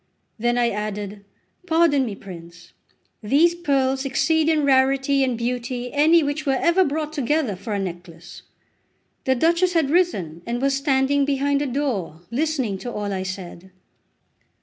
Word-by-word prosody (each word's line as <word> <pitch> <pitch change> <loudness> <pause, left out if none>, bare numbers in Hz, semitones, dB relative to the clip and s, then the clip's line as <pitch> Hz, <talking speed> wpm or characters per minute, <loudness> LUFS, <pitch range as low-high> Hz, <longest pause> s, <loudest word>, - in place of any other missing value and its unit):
Then 240 +2 +1
I 240 -1 +2
added: 210 -1 -5 0.4
"Pardon 320 -6 +3
me, 205 - -5
prince! 170 -2 -12 0.5
These 295 +10 +3
pearls 270 -5 0
exceed 315 +3 +1
in 310 -2 +2
rarity 270 0 +3
and 255 -3 -1
beauty 245 +1 -3
any 315 +3 +4
which 290 +2 -2
were 270 -3 +1
ever 340 +3 +3
brought 305 -1 -3
together 290 -5 0
for 200 +4 -6
a - - -1
necklace." 175 -2 -8 0.8
The 260 - +2
Duchess 340 +6 +2
had 315 -5 +1
risen, 195 - 0
and 240 +1 -2
was 275 +1 +1
standing 275 0 +2
behind 280 0 0
a 290 - -1
door 240 - -3
listening 260 -7 -1
to 245 - -6
all 205 -2 -3
I 190 - -2
said. 185 -1 -7
265 Hz, 150 wpm, -22 LUFS, 210-295 Hz, 0.8 s, any